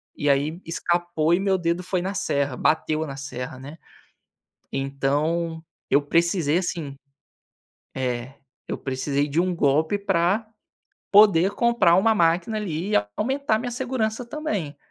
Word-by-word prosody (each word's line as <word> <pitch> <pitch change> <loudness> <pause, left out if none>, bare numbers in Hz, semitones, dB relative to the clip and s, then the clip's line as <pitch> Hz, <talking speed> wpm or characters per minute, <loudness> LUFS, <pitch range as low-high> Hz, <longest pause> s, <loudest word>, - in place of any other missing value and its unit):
e 145 - 0
aí 145 +5 +1
escapou 170 -1 0
e 180 - +2
meu 195 -1 +2
dedo 170 0 -1
foi 185 0 -1
na 190 +2 -3
serra, 140 -7 -1
bateu 155 +2 +1
na 135 -3 -7
serra, 130 -2 -6
né? 145 +4 -10 0.9
Então, 150 +5 -1 0.3
eu 140 - +4
precisei, 170 +1 +1
assim, 165 -6 -4 1.0
eh, 125 0 -3 0.3
eu - - -3
precisei 140 +2 -2
de 145 +3 -2
um 180 0 0
golpe 155 +4 +2
pra 195 +1 +1 0.7
poder 200 -3 +6
comprar 235 -8 +3
uma 220 +4 +4
máquina 175 +5 +1
ali 185 -2 -3
e - - +3
a 105 - +1
aumentar 265 -1 0
minha 245 +2 -4
segurança 240 -2 -2
também. 215 - -4
170 Hz, 140 wpm, -24 LUFS, 145-200 Hz, 1.0 s, poder